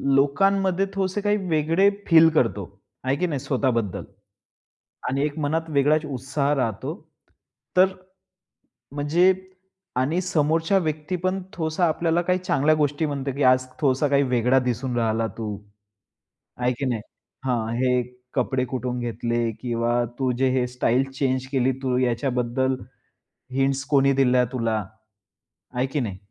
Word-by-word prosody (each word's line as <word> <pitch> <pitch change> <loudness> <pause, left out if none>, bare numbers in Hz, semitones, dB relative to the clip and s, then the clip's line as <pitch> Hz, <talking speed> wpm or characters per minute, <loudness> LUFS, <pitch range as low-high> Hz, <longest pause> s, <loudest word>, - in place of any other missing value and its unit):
लोकांमध्ये 190 +7 +2
थोडसे 195 +1 -1
काही 205 +1 +2
वेगळे 165 +5 +3 0.2
फील 165 -1 +7
करतो, 105 - +1 0.3
आहे 130 +1 +1
की 180 +5 0
नाही 145 -5 -2
स्वतः 130 0 0
बद्दल? 115 -6 -2 1.1
आणि 135 +2 0
एक 150 +1 -4
मनात 160 +2 -1
वेगळाच 150 +1 +2
उत्साह 140 +1 -1
राहतो 115 -7 -2 0.8
तर 185 - +8 1.1
म्हणजे 160 +6 +3 0.6
आणि 145 +7 +1
समोरच्या 165 +1 +1
व्यक्ती 155 +1 -2
पण 185 +1 0
थोडासा 165 -1 0
आपल्याला 165 +2 +1
काही 180 +1 +1
चांगल्या 155 -4 +2
गोष्टी 150 +1 0
म्हणते 140 -2 -3
की 140 +2 -2
आज 130 0 +4 0.2
थोडसा 140 0 +2
काही 140 0 +3
वेगळा 125 +1 +3
दिसून 125 0 -2
राहिला 115 0 +1
तू. 105 -3 -4 1.0
आहे 125 0 +1
की 140 - -1
नाही 120 -4 -1 0.4
हां, 115 -3 -1
हे 125 0 +2 0.3
कपडे 130 0 0
कुठून 125 -1 -3
घेतले? 120 0 -1
किंवा 120 0 0 0.2
तू 130 -1 +1
जे 130 0 +2
हे 130 -1 +1
स्टाईल 125 +1 +1
चेंज 130 -1 -1
केली 130 -1 +2
तू 125 -1 +1
याच्याबद्दल 125 +1 0 0.8
हिंट्स 135 +1 +1
कोणी 140 -1 +4
दिल्या 125 -2 +3
तुला? 115 -3 0 1.0
आहे 125 +1 0
की 140 +2 -2
नाही? 105 -7 -3
135 Hz, 140 wpm, -24 LUFS, 125-155 Hz, 1.1 s, तर